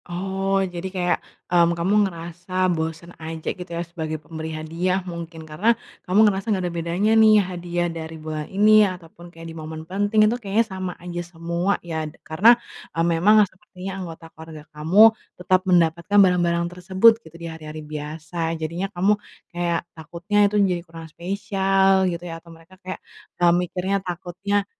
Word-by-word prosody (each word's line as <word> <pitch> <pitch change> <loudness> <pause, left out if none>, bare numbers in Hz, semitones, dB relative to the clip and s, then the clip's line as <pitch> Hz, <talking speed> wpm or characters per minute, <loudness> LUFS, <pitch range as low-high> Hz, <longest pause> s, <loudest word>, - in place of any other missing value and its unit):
Oh, 195 +2 -1
jadi 180 0 -5
kayak, 180 -2 0 0.4
mmm, 170 -1 +4
kamu 175 +4 0 0.2
ngerasa 170 +1 -10 0.2
bosen 165 +1 -4
aja 160 0 -7
gitu 180 -2 -10
ya, 170 0 -3
sebagai 160 -2 -5
pemberi 160 +1 -7
hadiah 170 +4 -2
mungkin, 170 -2 -7
karena, 195 +10 +1 0.3
kamu 210 +4 +6
ngerasa 200 +1 0
nggak 195 -4 +1
ada 175 - -3
bedanya 170 +5 0
nih 220 -1 +7
hadiah 175 -1 -2
dari 165 -1 -5
bulan 155 -1 -5
ini 215 +2 +6
ataupun 175 -1 -11
kayak 165 -1 -12
di 165 - -7
momen 160 0 -7
penting 205 +4 +2
itu 215 - +2
kayaknya 210 +2 +1
sama 185 -2 -5
aja 175 0 -5
semua 170 +2 -2
ya. 160 -2 -3 0.2
Karena, 170 +9 +4 0.5
eee, 165 - +2
memang 210 +6 +5
sepertinya 190 -1 -10
anggota 165 -2 -8
keluarga 160 -1 -11
kamu, 160 +7 +3 0.4
tetap 185 +1 +2
mendapatkan 170 +2 +2
barang-barang 170 -2 +1
tersebut 185 +5 +5
gitu, 160 -6 -16
di 170 - -8
hari-hari 155 -1 -8
biasa. 155 +2 -4
Jadinya 170 +5 -3
kamu, 190 +2 +2 0.4
kayak 170 -1 -1
takutnya 170 +6 -4
itu 210 - -4
jadi 180 -2 -1
kurang 165 -1 -11
spesial 195 0 +2
gitu 170 0 -5
ya, 165 -1 -7
atau 170 - -18
mereka 165 +2 -16
kayak, 185 0 -6 0.4
eee, 175 -1 +4
mikirnya 180 +2 -1
takutnya, 185 +3 -2
175 Hz, 160 wpm, -23 LUFS, 165-190 Hz, 0.5 s, nih